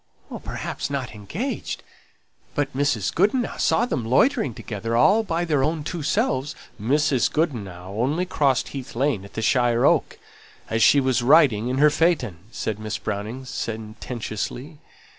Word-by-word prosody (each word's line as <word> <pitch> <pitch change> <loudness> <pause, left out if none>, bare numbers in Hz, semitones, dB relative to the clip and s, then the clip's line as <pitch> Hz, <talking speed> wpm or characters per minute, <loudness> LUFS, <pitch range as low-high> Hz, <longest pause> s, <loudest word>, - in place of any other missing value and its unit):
"Perhaps - - -4
not 135 -4 -3
engaged; 165 - -4 0.7
but 145 -2 -1
Mrs. 130 -9 0
Goodenough 215 +7 +1
saw 235 - +3
them 135 - -2
loitering 135 - +2
together, 115 +2 -3
all 200 - +5
by 175 -5 -1
their 150 -5 +1
own 155 +1 0
two 170 +2 -4
selves 150 - 0
" - - -18
"Mrs. 135 +1 +2
Goodenough 100 - -2
only 140 - 0
crossed 140 -7 +1
Heath 135 -4 -7
Lane 130 -5 0
at 100 - -13
the 110 - -3
Shire 120 -1 +3
Oak, - - +2 0.5
as 110 0 +1
she 145 - +6
was 130 -2 +1
riding 125 -5 +5
in 130 +1 -1
her 150 +2 +5
phaeton," 145 - +1
said 110 -2 -3
Miss 110 -1 -3
Browning 110 +6 -5
sententiously. 115 +5 -5
130 Hz, 150 wpm, -23 LUFS, 110-155 Hz, 0.7 s, she